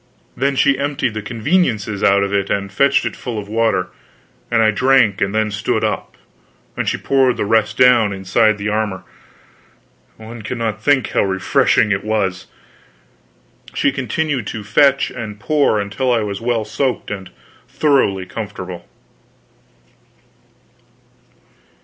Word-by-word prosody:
Then 140 +1 0
she 140 0 +3
emptied 140 -4 -1
the 110 - -4
conveniences 110 - -1
out 100 0 +4
of 100 0 -3
it 100 -1 0
and 100 -1 -2
fetched 140 0 +3
it - - -3
full 120 -3 -6
of 100 -1 -5
water, 110 -4 0 0.6
and 115 -1 +3
I 110 - +4
drank 125 -3 +3
and 100 +1 0
then 110 -1 +1
stood 105 0 -1
up, - - -3 0.6
and - - -1
she - - -2
poured 130 -2 +2
the - - -1
rest 110 +1 +1
down 120 -4 +5
inside 100 +3 +1
the 100 +1 -4
armor. 105 -3 -2 1.1
One 115 +1 -10
cannot 110 -1 -3
think 135 -1 +2
how - - +1
refreshing 95 +2 +2
it 100 -1 0
was. 105 -4 -2 1.3
She 140 - +2
continued 130 -1 -2
to 110 - -5
fetch 140 +6 +3
and 110 -4 -7
pour 140 -2 +1
until 105 +6 -1
I 115 -2 +2
was 100 -1 -4
well 115 -2 -1
soaked 120 +1 -2
and 95 -2 -6 0.4
thoroughly 130 -11 +1
comfortable. 95 -4 -7
110 Hz, 140 wpm, -18 LUFS, 100-125 Hz, 1.3 s, down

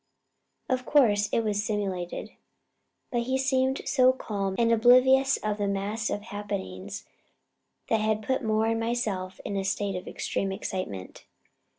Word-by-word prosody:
Of 255 -1 0
course 215 -8 +3
it - - +2
was 210 -2 -1
simulated, 195 -5 -3 0.8
but 240 - +1
he 260 +2 0
seemed 265 0 +1
so 255 -1 +5
calm 200 -6 -3
and 230 -1 +3
oblivious 255 +4 +5
of 210 0 -1
the 205 - 0
mass 205 +3 -2
of 205 - -3
happenings 105 - -6 0.8
that 225 -1 +2
had 215 0 0
put 260 +3 -1
Moore 220 0 +1
and 225 0 +1
myself 220 -6 -2
in 200 - -3
a 195 - -1
state 195 0 -1
of 180 - -6
extreme 195 - -2
excitement. 185 - -5
215 Hz, 150 wpm, -27 LUFS, 195-245 Hz, 0.8 s, so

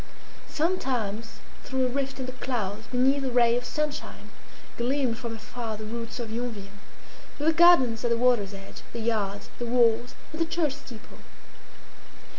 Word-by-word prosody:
Sometimes 245 - -1 0.2
through 265 -1 0
a - - +2
rift 270 +1 -2
in 260 - -2
the 255 - -4
clouds, 225 -4 -3
beneath 265 +2 +2
a 265 - 0
ray 240 -1 +4
of 245 - -1
sunshine, 300 +3 -4 0.4
gleamed 245 -1 0
from 235 -3 -4
afar 225 0 -5
the 215 - -7
roots 230 +2 -5
of 230 -2 -4
Yonville, 220 -4 -4 0.6
with 295 - -1
the - - +3
gardens 315 -10 +6
at 240 - +1
the 235 - +2
water's 235 -5 +3
edge, 195 0 -10
the 235 - -4
yards, 210 -3 -1
the 240 - -2
walls 235 0 +3 0.2
and 315 +1 -5
the - - +4
church 310 -5 +1
steeple. 255 -6 -12
240 Hz, 165 wpm, -27 LUFS, 225-265 Hz, 0.6 s, gardens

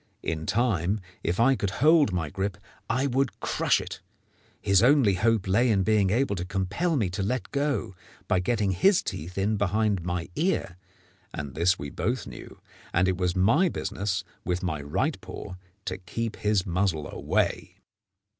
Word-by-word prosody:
In 80 -1 -3
time, 105 -4 +1 0.2
if 85 +5 -1
I 135 +3 +5
could 100 - -1
hold 155 - +5
my 80 -5 -2
grip, 95 0 -2 0.3
I 125 +4 +1
would 135 -1 0
crush - - +1
it. - - -7 0.6
His 100 -1 +3
only 125 -4 +5
hope 110 +1 +1
lay 115 +6 +3
in 100 -4 +3
being 105 -2 +3
able 115 +1 +1
to 90 - -2
compel 95 - -1
me 110 -8 +1
to 95 - -3
let 125 +7 -2
go, 140 -9 -1 0.3
by - - +2
getting 105 +1 0
his 180 - +3
teeth 85 +4 -6
in 105 +2 +1
behind 100 0 +1
my 85 0 -3
ear; 160 - 0 0.6
and 70 -2 -5
this 85 +4 +2
we 70 0 -6
both 120 +9 -2
knew, - - -10 0.3
and 90 +2 +2
it 95 -1 +1
was 90 0 0
my 115 - +4
business 95 - -2 0.2
with 90 +1 -2
my 80 -5 -2
right 70 +1 -1
paw - - -8 0.3
to 95 0 -3
keep 110 +5 -4
his 105 -2 +1
muzzle 90 -4 0
away. - - -1
100 Hz, 170 wpm, -27 LUFS, 90-115 Hz, 0.6 s, I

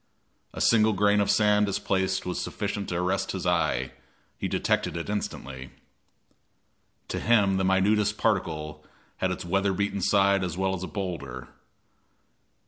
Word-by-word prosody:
A - - -6
single 110 -1 +4
grain 105 +1 +3
of 100 - 0
sand 105 -1 +3
displaced 95 -1 -1
was 90 - -3
sufficient 100 - -4
to 85 - -2
arrest 90 +1 -1
his - - -4
eye; - - +1 0.4
he - - -3
detected - - 0
it 85 +4 -4
instantly. 65 -10 -5 1.4
To - - -2
him 100 -5 +3
the 95 - 0
minutest 100 +3 +2
particle 75 -8 -1 0.3
had 95 - 0
its 90 - -4
weather 95 +2 +1
beaten 100 +1 -1
side 100 0 +3
as 90 -2 -3
well 95 0 0
as 95 - -4
a 95 - -4
boulder. 70 - -5
95 Hz, 145 wpm, -27 LUFS, 90-105 Hz, 1.4 s, single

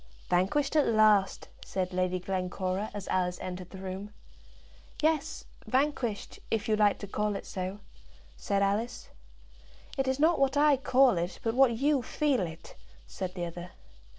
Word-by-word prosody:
"Vanquished 240 - +1
at 300 - +4
last!" 215 -3 +3 0.2
said 185 -1 -3
Lady 185 0 0
Glencora, 185 +2 -2
as 205 -2 -7
Alice 180 -1 0
entered 180 -1 -6
the 190 - -10
room. 190 +2 -6 0.9
"Yes, 315 0 0 0.2
vanquished; 260 -5 -1
if 220 -2 -1
you 215 - +3
like 210 -1 +3
to 200 - -7
call 210 +1 -1
it - - -6
so," 190 +2 -5 0.5
said 200 -1 0
Alice. 215 +5 -1 0.9
"It 270 - +1
is 260 +1 0
not 320 +3 +4
what 275 +1 +2
I 295 0 +5
call 255 -5 +4
it, 175 +1 -4
but 225 - 0
what 250 -2 +4
you 285 +1 +2
feel 280 0 0
it," 165 -2 -7 0.3
said 180 - -6
the 175 -2 -2
other. 175 +1 -8
205 Hz, 155 wpm, -29 LUFS, 185-265 Hz, 0.9 s, I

